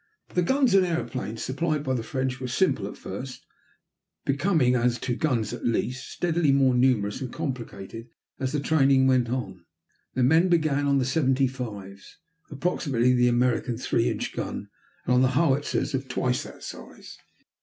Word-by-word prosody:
The 180 - +2
guns 265 +4 +2
and 195 -1 +6
airplanes 135 -10 -3
supplied 150 +2 -1
by 130 -3 -1
the 125 - -1
French 130 +2 -3
were 130 - -4
simple 125 - +1
at - - -9
first, 125 +7 -7 0.8
becoming, 140 -2 +2
as 120 -1 +2
to 120 - -1
guns 120 -7 0
at 120 - -7
least, 120 +2 -1
steadily 170 -4 +1
more 135 -2 +4
numerous 125 -4 +2
and 130 -2 -4
complicated 115 -7 -6 0.3
as 130 -1 -1
the 150 - 0
training 140 -3 +3
went 130 -2 +3
on. 125 0 -4 0.5
The 130 - +2
men 160 +8 +4
began 155 -4 +2
on 140 0 +3
the 130 - +1
seventy 135 -1 +2
fives, 105 -7 -7 0.3
approximately 140 -5 +1
the 125 0 +4
American 120 -1 +1
three 115 -1 +1
inch - - -3
gun, - - -5 0.4
and 125 - +2
on 125 - +4
the 130 0 +2
howitzers 145 -3 +1
of 135 0 -2
twice 125 -1 0
that - - -12
size. - - -10
130 Hz, 165 wpm, -26 LUFS, 125-145 Hz, 0.8 s, and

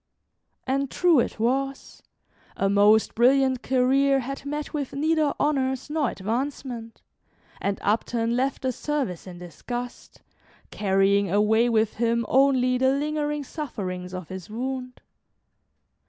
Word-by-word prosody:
And 275 +1 0
true 345 -3 +3
it 235 - -2
was, 270 +4 -2 0.6
a 195 - +1
most 210 +2 +4
brilliant 260 +1 +3
career 270 +2 +2
had 275 +2 -6
met 295 +2 -4
with 285 -3 -3
neither 310 0 +1
honors 265 -1 0
nor 300 -5 +1
advancement, 235 +2 -4 0.6
and 200 0 -1
Upton 230 +2 0
left 265 +2 -1
the 260 - +1
service 255 - -3
in 180 -1 -9
disgust, 240 +8 -8 0.5
carrying 195 0 +2
away 215 +5 +3
with 220 -2 +1
him 235 0 +1
only 255 -2 +3
the 260 0 +3
lingering 295 +1 -1
sufferings 190 - -5
of 185 -3 -7
his 185 -1 -8
wound. 255 +2 -5
250 Hz, 125 wpm, -25 LUFS, 215-275 Hz, 0.6 s, most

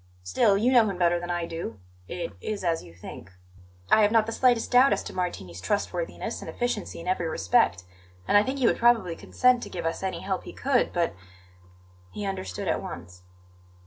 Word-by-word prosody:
Still, 95 - +3
you 235 +5 +2
know 230 -4 +6
him 195 - -4
better 175 -1 +2
than 175 0 -6
I 175 -1 -1
do; 165 - -6 0.3
it 175 - -5
is 210 -3 -4
as 165 -2 0
you 85 - -13
think." 85 +1 -11 0.6
"I 220 - +7
have 210 0 +4
not 225 -1 +4
the 225 - -4
slightest 240 -1 +2
doubt 255 +2 +6
as - - -2
to - - -8
Martini's 95 - -4
trustworthiness 210 - -2
and - - -7
efficiency 240 -7 -3
in 170 - -9
every 180 -2 0
respect; 90 - +2 0.4
and - - +2
I 205 - +8
think 260 +6 -2
he 260 - +1
would - - +3
probably 230 -8 +3
consent 250 +5 +2
to - - -7
give 170 -2 -5
us 165 - -2
any 190 -1 -3
help 190 -1 -3
he - - -8
could. 265 -2 +1
But 170 -1 0 0.5
" 90 0 -27
He 205 - -4
understood 95 - -4
at - - 0
once. 90 +1 -9
180 Hz, 210 wpm, -26 LUFS, -, 0.6 s, I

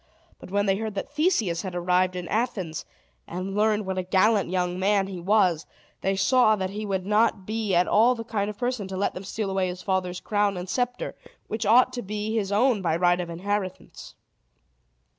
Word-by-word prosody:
But - - -11
when 205 +1 +1
they 195 -1 +2
heard 220 -1 -4
that 195 - -4
Theseus 290 - +1
had 185 -3 -6
arrived 180 +1 +1
in 180 -1 -5
Athens, 200 -8 -2 0.4
and 185 +2 -5
learned 210 0 +2
what 190 0 -2
a - - +1
gallant 195 +2 +2
young 180 0 -1
man 200 +1 +2
he 190 -2 -6
was, 180 -3 +2 0.3
they 195 +1 0
saw 215 +3 +4
that 190 -2 -3
he 210 +1 -5
would 190 -2 -2
not 210 -1 +2
be 215 -2 -1
at 175 +1 +3
all 235 +4 +4
the 230 - -6
kind 210 -3 -2
of 210 - -6
a - - -31
person 245 -5 -2
to 190 0 -5
let 200 - 0
them 185 - -7
steal 200 0 -3
away 190 -1 0
his 180 0 -6
father's 185 -2 -1
crown 205 -2 0
and 180 +1 -5
scepter, 250 - -2 0.3
which 220 -1 -3
ought 250 +3 +5
to 245 - -3
be 210 +2 -3
his 205 -3 -1
own 220 +1 +3
by 165 -3 +1
right 175 +1 +3
of 175 - -6
inheritance. 190 +2 -4
200 Hz, 210 wpm, -25 LUFS, 185-215 Hz, 0.4 s, ought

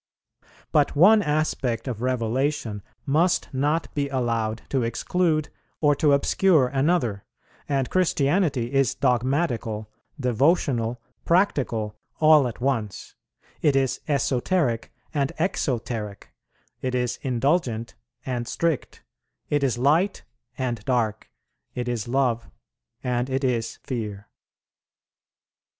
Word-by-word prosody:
But 150 -1 +2
one 205 +8 +7
aspect 150 - -1
of 120 -3 -4
Revelation 125 -2 -1 0.2
must 165 +4 +1
not 145 +5 0
be 140 -1 -1
allowed 115 -4 -1
to 135 - +1
exclude 155 +7 0 0.3
or 145 -2 +4
to 150 -2 +4
obscure 145 -1 +3
another; 135 - +1 0.5
and 135 -3 +1
Christianity 145 -7 +1
is 135 -3 +2
dogmatical, 125 -4 0 0.3
devotional, 125 -2 +1 0.2
practical 120 - +1 0.2
all 155 -4 +6
at 120 - -7
once; 120 -6 -2 0.5
it 145 -3 +3
is 135 -2 +1
esoteric 135 -2 0 0.2
and 140 -3 0
exoteric; 120 - -2 0.5
it 130 -1 -1
is 125 -1 -1
indulgent 125 -3 0 0.3
and 120 -2 -3
strict; 165 +2 -2 0.5
it 145 -1 +2
is 130 -3 +1
light 160 +10 +2 0.3
and 120 -5 -2
dark; 110 -4 -1 0.5
it 125 0 -3
is 120 -3 -2
love, 120 -2 0 0.5
and 125 +1 -1
it 135 +1 -1
is 120 -3 -1
fear. 105 -5 -5
130 Hz, 105 wpm, -25 LUFS, 115-150 Hz, 0.5 s, one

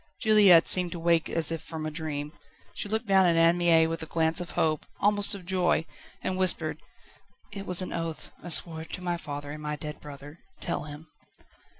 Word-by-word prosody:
Juliette 205 -7 +5
seemed 180 -2 +5
to 170 - -7
wake 165 -1 +1
as 165 -1 +2
if 165 - -4
from 160 -1 -7
a 155 - -4
dream. 150 -1 -6 0.4
She 205 - -5
looked 220 +2 -2
down 190 -3 +3
at 170 - +2
Anne 165 +1 +4
Mie 165 -2 +4
with 165 0 -4
a 160 - -6
glance 160 +1 0
of 175 - -7
hope, 155 -2 0
almost 205 0 +2
of 190 -3 -11
joy, 180 -3 0 0.4
and 185 0 -3
whispered: 170 -4 +2 0.7
"It 195 -1 -8
was 180 0 +4
an - - -7
oath 165 -1 -5
I 175 - -9
swore 160 -1 +3
it 160 - -11
to 180 - -6
my 175 -1 -2
father 145 -3 -7
and 150 +1 -8
my 150 0 -4
dead 150 0 -8
brother. 145 +2 -12 0.2
Tell - - -2
him." 150 +2 -11
165 Hz, 210 wpm, -27 LUFS, 155-180 Hz, 0.7 s, Juliette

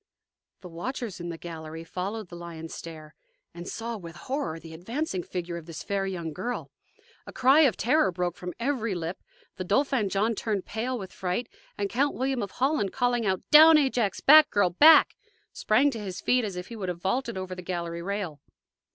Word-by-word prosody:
The 185 - -9
watchers 210 +5 -5
in 175 0 -5
the 165 - -5
gallery 160 -1 -8
followed 190 +4 -5
the 175 - -9
lion's 165 -2 -8
stare, 155 -2 -9 0.4
and 175 +1 -9
saw, 230 0 -4
with 170 -4 -10
horror, 265 - -4
the 165 0 -11
advancing 210 - -3
figure 175 -1 -5
of 165 -1 -10
this 165 -2 -7
fair 200 -1 -1
young 170 -4 -4
girl. 220 +9 -4 0.6
A - - -7
cry 265 +4 +4
of 280 -7 +4
terror 300 0 +2
broke 175 0 -2
from 180 0 -7
every 235 -5 -1
lip. 170 +1 -4 0.4
The 185 - -3
Dauphin 230 +2 +1
John 210 +4 +1
turned 210 -3 -2
pale 245 +4 -3
with 190 -4 -8
fright, 185 +6 -2 0.3
and 200 - -1
Count 275 +7 0
William 260 0 -1
of 200 - -3
Holland, 260 -6 0
calling 245 -3 0
out, 190 -1 0
"Down, 315 +1 +9
Ajax! 250 -8 +1
back, 305 +2 +8
girl, 200 -4 +2
back!" 310 - +7 0.4
sprang 265 +7 +2
to 230 - -6
his 195 -3 -6
feet 250 +4 +2
as 200 -4 -4
if 180 0 -7
he 235 - -7
would 195 -4 -4
have 175 -1 -6
vaulted 235 +3 -1
over 185 0 -5
the 180 - -7
gallery 170 -1 -4
rail. 190 -5 -4
195 Hz, 195 wpm, -27 LUFS, 175-245 Hz, 0.6 s, Down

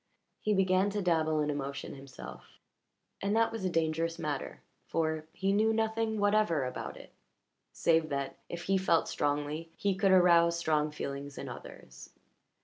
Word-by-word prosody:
He 210 -1 +1
began 190 +1 +3
to 205 0 -2
dabble 160 -3 +2
in 150 0 0
emotion 140 -1 -4
himself, 135 -1 -11 0.6
and 200 +2 0
that 225 0 +3
was 225 -3 -5
a 185 - +1
dangerous 165 0 0
matter, 145 -3 -4 0.2
for 160 -1 -1
he 195 +3 0
knew 215 +2 +3
nothing 220 0 0
whatever 205 -8 +2
about 125 - -5
it - - -13 0.6
save 160 -1 +2
that, 140 -1 -3
if 170 0 -5
he 195 +1 +2
felt 170 -3 +2
strongly, 145 +3 -1
he 200 -1 0
could 195 +1 +2
arouse 170 -2 +5
strong 155 -2 +1
feeling 140 -1 -5
in - - -5
others. - - -10
170 Hz, 155 wpm, -31 LUFS, 150-195 Hz, 0.6 s, arouse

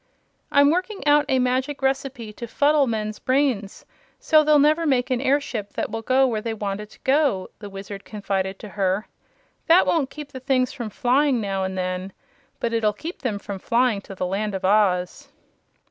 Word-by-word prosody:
"I'm 285 0 +5
working 370 +3 -2
out 295 0 +5
a 265 - +3
magic 260 +3 0
recipe 265 -4 -2
to 235 +3 -7
fuddle 285 +3 +3
men's 215 -2 -3
brains, 255 -7 0 0.3
so 310 -1 +4
they'll 305 0 +5
never 310 +3 +3
make 260 -2 +1
an 250 -1 +1
airship 265 -6 -1
that - - -3
will 225 +1 -3
go 260 +3 +3
where 225 -4 -1
they 225 0 -3
want 205 -2 -3
it 210 - -10
to - - -18
go," 265 -9 +1
the 205 -1 -8
Wizard 195 0 -8
confided 195 -2 -3
to 210 - -10
her. 195 +1 -1 0.6
"That 340 +2 +6
won't 300 -6 +1
keep 295 -1 -9
the 260 - -7
things 255 -1 +1
from 240 -6 -5
flying, 255 +4 +2
now 195 -2 -2
and 190 0 -3
then, 185 +1 -3 0.5
but 230 - -2
it'll 220 -2 +2
keep 330 - -8
them 230 -6 -2
from 200 -1 -7
flying 235 -1 +1
to 195 - -10
the 185 - -2
Land 200 +2 -2
of 190 0 -3
Oz." 195 +4 +1
235 Hz, 190 wpm, -23 LUFS, 200-280 Hz, 0.6 s, That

